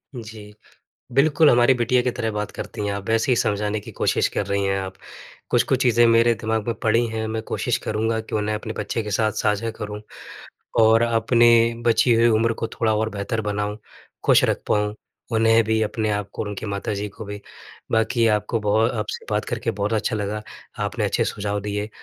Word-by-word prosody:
जी, 110 -3 -9 0.6
बिल्कुल 150 +3 +4
हमारी 120 +2 +5
बिटिया 125 +1 +2
की 125 - 0
तरह 110 -1 -3
बात 105 0 -4
करती 105 - -6
हैं 100 - -1
आप, 100 -1 -5
वैसे 115 +3 +2
ही 125 - +4
समझाने 105 0 0
की - - -11
कोशिश - - +1
कर - - -2
रही 100 0 -1
हैं 95 0 0
आप, 95 0 -5 0.6
कुछ-कुछ 130 -1 +2
चीज़ें 120 -2 +4
मेरे 115 +1 +4
दिमाग 110 -1 -1
में 115 - +1
पड़ी 115 +2 +3
हैं, 110 0 -3
मैं 110 0 -3
कोशिश - - -1
करूँगा 110 +1 0
कि 110 - -6
उन्हें 105 0 -1
अपने 110 +1 -5
बच्चे 105 +2 -2
के 105 - -5
साथ 110 +1 +1
साझा 105 +2 0
करूँ 105 0 -5 0.8
और 110 +1 +5
अपने 120 +1 +4 0.4
बची 115 +1 +4
हुई 115 +1 +4
उम्र 115 +1 +2
को 115 - 0
थोड़ा 110 -1 0
और 110 +1 0
बेहतर 105 +3 -3
बनाऊँ, 105 0 -3 0.5
खुश - - +5
रख - - 0
पाऊँ, 105 0 +1 0.4
उन्हें 115 0 +4
भी, 110 +1 +1
अपने 110 0 -1
आप 105 -1 -2
को - - -3
और 105 - -5
उनकी 105 +1 -6
माता 100 +2 -3
जी 100 +1 -3
को 110 +2 -10
भी। 105 0 -7 0.5
बाकी 115 +1 +2
आपको 105 +1 0
बहु 105 +2 +2
आपसे 105 - -4
बात - - 0
करके - - -2
बहुत 100 +2 -2
अच्छा 110 +1 0
लगा, 105 +1 -3 0.4
आपने - - -2
अच्छे - - +1
सुझाव 105 0 -3
दिए, 105 +1 -3
110 Hz, 200 wpm, -22 LUFS, 105-115 Hz, 0.8 s, हमारी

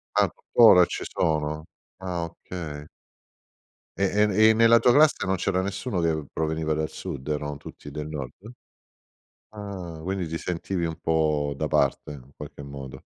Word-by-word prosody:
Ancora 95 -7 +5
ci - - -5
sono? 75 -1 -1 0.3
Ah, 90 -2 -3
okay. 80 -3 -8 1.1
E 100 - 0 0.2
e 105 +1 +5
e - - +6
nella 115 +1 +6
tua 125 - +4
classe 150 -3 +4
non 95 0 +1
c'era 95 +1 0
nessuno 100 +1 -3
che 80 -3 0
proveniva 80 0 -1
dal 80 0 -1
sud? 65 - -7
Erano 75 -1 -2
tutti 75 0 -11
del 75 +1 -5
nord? 75 - -7 1.0
Ah, 95 -6 -7
quindi 95 -2 -2
ti 80 - -3
sentivi 90 0 -3
un 80 -1 -4
po' 75 -3 +1
da - - -2
parte - - +1
in 70 0 -13
qualche 70 - -9
modo. 70 -2 -9
80 Hz, 150 wpm, -25 LUFS, 75-95 Hz, 1.1 s, e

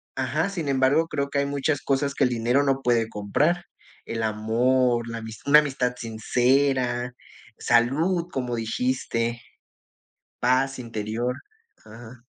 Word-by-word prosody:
ajá, 145 +8 -1
sin 170 -7 -4
embargo 140 +4 +3
creo 140 -2 -2
que 140 - 0
hay 140 - +1
muchas 140 +1 -1
cosas 140 0 0
que - - +2
el - - +2
dinero 120 +3 +1
no 135 -1 +1
puede 115 -2 +2
comprar, 150 - 0 0.4
el 115 0 -4
amor, 120 +3 +1
la 115 -1 -6 0.2
una 150 +1 +8
amistad 130 -4 -1
sincera, 125 +2 +1 0.5
salud, 155 +10 +2
como 125 -2 -2
dijiste, 115 0 -2 1.0
paz 130 +2 +1
interior, 115 +1 -3 0.5
ajá. 120 +2 -13
125 Hz, 125 wpm, -25 LUFS, 115-140 Hz, 1.0 s, una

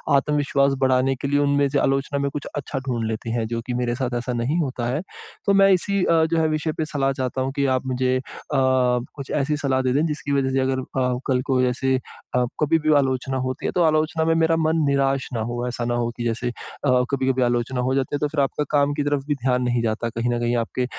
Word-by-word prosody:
आत्मविश्वास 140 -1 +2
बढ़ाने 130 0 +2
के 130 - -4
लिए 145 +1 +2
उनमें 140 0 +2
से 140 +1 +1
आलोचना 135 +1 0
में 140 0 0
कुछ 145 0 -5
अच्छा 140 -1 -3
ढूँढ 120 -3 -1
लेते 110 +1 -4
हैं 115 -1 -1
जो 115 +1 -3
कि 125 - -2
मेरे 120 -1 -1
साथ 125 -1 -2
ऐसा 125 +1 -3
नहीं 120 +7 0
होता 130 -6 -2
है। 130 +6 -1 0.4
तो 200 - +3
मैं 195 0 +6
इसी 195 +1 +2
अ, 165 -2 +3
जो 165 +1 0
है 160 - +3
विषय 155 +1 -1
पे 160 - 0
सलाह 140 -3 0
चाहता 130 0 -2
हूँ 130 +1 -1
कि 140 -1 +1
आप 130 - -3
मुझे 130 0 +1
अ, - - -3 0.3
कुछ 130 0 +1
ऐसी 150 +1 0
सलाह 135 -2 0
दें 130 -1 0
दें 145 +4 +2
जिसकी 150 -2 -3
वजह 135 -1 +2
से 135 - +1
अगर 130 0 0
अ, 125 -1 -1
कल 130 -2 +2
को 130 -1 +2
ऐसे 130 +1 0 0.4
अ, 125 - +3 0.2
कभी 160 +2 +3
भी 155 0 +2
आलोचना 130 -1 0
होती 130 0 -3
है - - 0
तो 175 - +3
आलोचना 155 0 +2
में 165 - +3
मेरा 165 0 +3
मन 160 0 +1
निराश 135 -1 +1
न 120 - -1
हो। 120 +1 -3
ऐसा 120 -1 -3
न 120 - -1
हो 120 -1 0
कि 120 - -3
जैसे 120 +1 -1
अ, - - -4 0.6
कभी-कभी 130 -1 +1
आलोचना 120 +1 0
हो 130 +1 0
जाती 135 +1 -1
है, - - -2
तो 150 - +1
फ़िर 145 0 -1
आपका 140 +2 0
काम 145 -1 +3
की 145 0 -1
तरफ 145 -1 0
भी 145 - +1
ध्यान 125 -1 0
नहीं 120 -1 +1
जाता। 115 +1 -1
कहीं 115 +1 -2
न 120 - -1
कहीं 120 0 0
आपके 120 +2 -1
135 Hz, 250 wpm, -23 LUFS, 125-145 Hz, 0.6 s, मैं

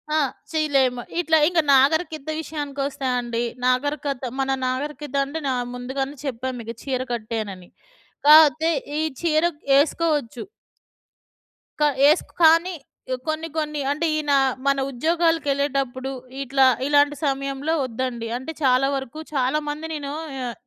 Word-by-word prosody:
ఆ! - - +3 0.3
చేయలేము. 275 -6 +1 0.2
ఇట్లా 320 -2 +3
ఇంగ 350 0 +2 0.2
నాగరికత 310 +2 +2
విషయానికొస్తే 285 -3 -4
అండి. 240 -1 -2 0.2
నాగరికత 275 +1 0 0.2
మన 270 0 0 0.2
నాగరికత 290 +2 -4
అంటే 290 +4 -5
న - - +1 0.3
ముందుగానే 265 +3 -4
చెప్పా 260 -1 -3
మీకు 230 0 -6
చీర 260 -2 -2
కట్టేనని. 215 -5 -5 0.6
కా 300 - +10
అయితే 315 +4 -2 0.3
ఈ - - +1 0.2
చీర 320 -1 +2 0.3
ఎసుకోవచ్చు 295 -4 0 1.4
క - - +2 0.3
ఎస్కో 310 - +1
కానీ 335 +3 +5 0.5
కొన్ని, 315 +1 -2
కొన్ని 300 -1 -2
అంటే 305 +4 -1
ఈయన 300 -2 0 0.3
మన 275 0 +3
ఉద్యోగాలకెళ్ళేటప్పుడు 280 -3 0 0.3
ఇట్లా 270 0 +3 0.2
ఇలాంటి 290 0 +4
సమయంలో 275 +2 -1
ఒద్దండి. 240 -1 -4
అంటే 260 +6 -6
చాలా 260 0 +4
వరకు, 270 +2 -6
చాలా 265 +2 +1
మంది 300 +2 -5
నేను 285 -2 -5 0.3
ఆహ్, 240 -1 -3
280 Hz, 120 wpm, -23 LUFS, 260-310 Hz, 1.4 s, కా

